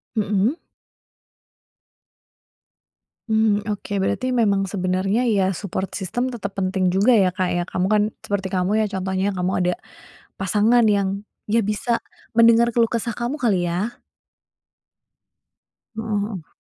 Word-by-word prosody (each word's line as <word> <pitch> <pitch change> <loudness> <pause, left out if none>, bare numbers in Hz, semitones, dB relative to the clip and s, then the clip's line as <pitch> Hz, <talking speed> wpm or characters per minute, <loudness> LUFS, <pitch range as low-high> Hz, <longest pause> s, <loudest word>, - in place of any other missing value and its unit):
Mhm. 210 +4 +1 2.7
Mmm, 220 -1 +2
oke. 205 -1 -4
Berarti 255 +6 -1
memang 205 -5 +2
sebenarnya 195 +5 0
ya, 195 -4 +2
support 190 0 -4
system 245 +7 -2
tetap 205 -4 -6
penting 185 -1 0
juga 195 +7 +3
ya, 205 -6 +5
Kak, 185 -1 0
ya? 175 0 0
Kamu 185 0 -1
kan 210 -1 +4 0.2
seperti 200 -2 -2
kamu 190 +3 0
ya 215 - +2
contohnya, 190 +1 -1
kamu 180 +1 -1
ada 180 0 +1 0.7
pasangan 220 +4 +3
yang 200 0 0 0.2
dia 220 +2 +1
bisa 215 +2 0 0.3
mendengar 230 +1 +5
keluh 230 0 +3
kesah 235 +1 -2
kamu 240 +5 -3
kali, 200 - +1
ya. 200 +8 -3 2.0
Heeh 220 -2 -2
heeh. 200 -6 -6
205 Hz, 125 wpm, -22 LUFS, 190-230 Hz, 2.7 s, ya